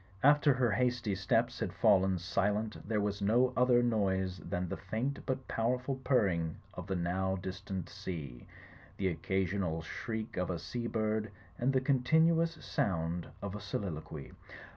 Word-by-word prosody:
After 145 0 +6
her 125 -3 +2
hasty 125 -2 +1
steps 95 0 +1
had - - -1
fallen 95 -1 +4
silent 105 +4 -1
there 110 -2 +2
was 100 0 -1
no 120 +5 +3
other 125 -1 +4
noise 95 -5 +1
than 90 0 -3
the - - -3
faint 130 +6 -3
but 130 0 -2
powerful 125 +4 0
purring 95 - +1 0.2
of - - -7
the 95 - -1
now 95 +2 0
dis 95 0 -5
tant 95 -3 -4
sea, 80 -11 -7 0.5
the 95 -1 +1
occasional 90 -1 -1
shriek 110 +6 -5
of 90 0 0
a 90 - -1
sea 120 +8 -4
bird, 110 -1 0 0.3
and 125 +3 +2
the 130 -1 +2
continuous 160 +5 +3
sound 85 -2 -1 0.2
of 100 -1 -3
a 105 - -6
soliloquy. 80 -7 -5
100 Hz, 155 wpm, -33 LUFS, 95-125 Hz, 0.5 s, After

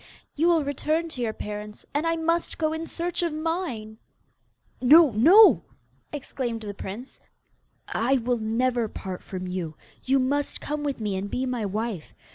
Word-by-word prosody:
You 320 +3 +2
will 335 -3 +4
return 305 +4 -1
to 260 -6 -6
your 230 -2 0
parents, 210 0 -7
and 295 +3 0
I 330 - +2
must 330 +1 0
go 310 -1 0
in 320 +1 -4
search 345 +1 -2
of 340 -2 0
mine.' 305 -9 -3 0.8
'No! 300 +3 +7
no!' 345 - +7 0.5
exclaimed 255 -5 -4
the 205 -2 -5
prince. 205 +6 -8 0.7
'I 255 +5 +2
will 245 0 0
never 235 +2 0
part 190 -3 -7
from 185 -1 -6
you. 180 -4 -4 0.3
You 270 +1 +3
must 280 +2 0
come 300 0 -4
with 285 -3 -2
me 210 -3 -2
and 195 +2 -3
be 255 +4 -1
my 245 -5 -2
wife. 210 -4 -4
255 Hz, 165 wpm, -26 LUFS, 215-315 Hz, 0.8 s, No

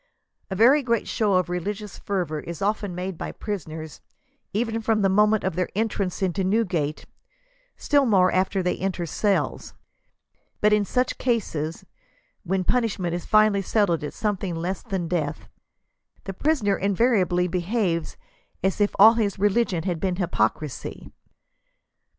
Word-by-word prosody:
A 190 - -3
very 250 +9 +5
great 235 -4 0
show 210 -4 +1
of 185 0 +2
religious 200 +3 -4
fervor 175 -6 -2
is 170 +2 -7
often 205 -2 -1
made 180 -1 -5
by - - -4
prisoners, 160 -7 -6 0.5
even 225 +1 -1
from 220 -2 +1
the 195 - +4
moment 210 +2 +3
of 190 -3 -1
their 180 0 -1
en 220 +2 +1
trance 195 -2 -3
into 190 +1 0
Newgate, 185 -7 0 0.7
still 285 -3 +2
more 185 -4 +4
after 190 +1 +1
they 180 - 0
enter 185 -2 -2
the - - -2
cells. 200 +5 -1 0.8
But 210 0 +4
in 210 -1 +3
such 250 +4 -1
cases, 165 - -2 0.6
when 190 +1 -1
punishment 200 -6 0
is 175 -1 -4
finally 215 -2 +4
settled 190 -5 +1
at 150 - -5
something 200 -4 -2
less 175 +3 -3
than 190 -7 -3
death, 160 -4 -2 0.8
the 195 - -5
prisoner 215 -4 +1
invariably 195 -3 +2
behaves 180 -1 -1 0.5
as 190 +2 0
if 205 - +1
all 220 +3 +9
his 215 -4 -1
religion 200 -3 +1
had 175 -3 -2
been 185 0 -1
hypocrisy." 150 - -2
195 Hz, 150 wpm, -24 LUFS, 175-215 Hz, 0.8 s, all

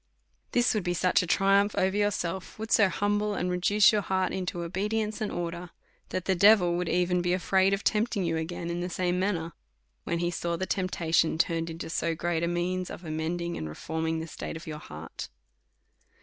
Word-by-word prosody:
This 245 0 +3
would 215 -3 -1
be 175 0 -1
such 180 +1 +3
a 180 - -4
triumph 195 +3 +3
over 190 +1 +2
yourself, 190 -3 -1
would 220 +1 -6
so 205 -3 +5
humble 205 +2 0
and 180 -1 -1
reduce 200 +4 +5
your 210 -2 +1
heart 190 -1 0
into 180 -2 -3
oliedience 210 +5 -2
and 215 - -1
order, 175 0 -4 0.4
that 185 - -3
the 190 - +2
devil 185 -1 +6
would 180 0 -1
be - - 0
even 180 0 +2
afraid 190 +1 +2
of 195 +1 -1
tempting 210 -2 +1
you 165 -1 0
again 170 +1 -3
in 170 - -2
the 180 - -3
same 180 0 0
manner, 170 -4 -1 0.5
when 170 - -1
he 175 +1 0
saw 170 0 -2
the 190 - -2
temptation 170 -4 +1
turned 165 0 0
into 165 0 -6
so 165 0 -1
great 170 0 -1
a 170 - +1
means 180 +1 -1
of 175 - -8
amend 160 +2 -2
ing 170 0 -3
and 80 - -4
reforming 160 - -3
the 160 - -4
state 165 - -6
of 165 - -11
your 155 -1 -6
heart. 80 - -8
180 Hz, 205 wpm, -28 LUFS, 170-195 Hz, 0.5 s, devil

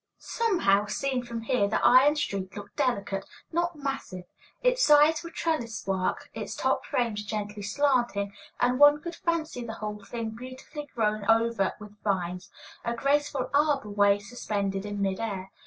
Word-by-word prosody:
Somehow, 340 - +1
seen 260 +4 -1
from 235 -1 -5
here, 225 -3 +2
the 200 - 0
iron 270 +4 +7
street 195 -10 -3
looked 205 0 -9
delicate, 200 -8 0 0.3
not 345 +1 0
massive; 275 -11 -4 0.4
its - - +3
sides 300 +2 +6
were 335 - -7
trellis 310 -9 -2
work, 190 -1 -1
its - - -5
top - - 0
frames 225 -4 -1
gently 210 0 -4
slanting, 215 -3 +1 0.3
and 250 +1 +2
one 290 0 +8
could 340 +3 -6
fancy 320 -8 -2
the 225 -1 -5
whole 210 -1 -6
thing 230 -2 -4
beautifully 255 +5 -8
grown 215 -2 0
over 225 -3 +3
with 210 -1 -13
vines, 180 -2 -2 0.3
a 235 0 -1
graceful 280 +1 0
arbor 285 -7 +2
way 200 0 +4
suspended 205 -3 -3
in 205 -1 -2
mid 195 0 -1
air. 195 -4 -4
230 Hz, 155 wpm, -28 LUFS, 205-285 Hz, 0.4 s, one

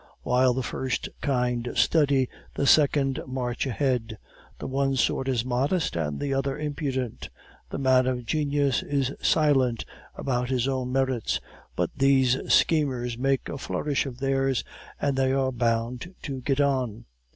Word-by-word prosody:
While 125 0 +3
the 130 - -1
first 130 0 -3
kind 125 -3 0
study, 140 -5 +3 0.3
the 140 - 0
second 140 -2 +4
march 125 0 -2
ahead; 125 -4 -1 0.4
the - - -7
one 135 0 0
sort 130 +1 +1
is 125 -3 0
modest, 135 - 0
and 75 -4 -2
the 140 -1 -1
other 135 0 -1
impudent; 140 -5 -3 0.4
the - - -4
man 130 -1 +3
of 125 -2 -2
genius 145 -1 +1
is 140 -1 -1
silent 135 -7 +2 0.3
about 125 -2 -1
his 130 -1 +1
own 130 -2 -1
merits, 130 -3 0 0.4
but - - 0
these 135 -2 +4 0.2
schemers 130 -7 +2
make 135 +2 0
a 140 - -5
flourish 145 +1 -1
of 125 -3 -7
theirs, 135 -1 0 0.4
and 140 -2 0
they 135 0 +2
are 135 -1 +1
bound 120 +6 -1
to 135 -3 -4
get 135 +2 0
on. 130 -6 0
130 Hz, 150 wpm, -26 LUFS, 125-140 Hz, 0.4 s, second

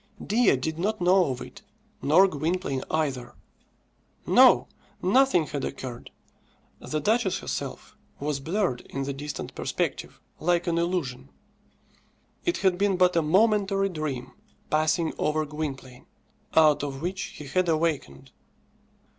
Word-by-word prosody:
Dea 220 - +3
did 160 +5 -3
not 210 +4 -1
know 180 +1 +4
of 130 -2 -3
it, - - -10 0.4
nor 160 +8 +5
Gwynplaine 155 -3 -2
either. 135 -6 -2 0.9
No; - - +6 0.3
nothing 195 -3 +3
had 145 -2 -5
occurred. 125 -3 -6 0.7
The 155 - -3
duchess 215 +1 +1
herself - - -6 0.2
was 145 -1 -2
blurred 165 - -1
in 135 - -3
the 140 +1 -3
distant 145 +2 -6
perspective - - -3 0.2
like 175 +1 +1
an 170 -1 0
illusion. 140 -7 -2 1.2
It 345 - +1
had 185 -1 +3
been 200 -2 +2
but 180 -1 +3
a 165 - +4
momentary 195 +3 +2
dream 145 -7 -4 0.4
passing 155 +2 +1
over 155 0 0
Gwynplaine, 140 -4 -6 0.5
out 155 -2 +5
of 140 0 -5
which 185 +2 -2 0.2
he 150 - -8
had 180 +5 0
awakened. 155 - -1
160 Hz, 130 wpm, -26 LUFS, 140-185 Hz, 1.2 s, No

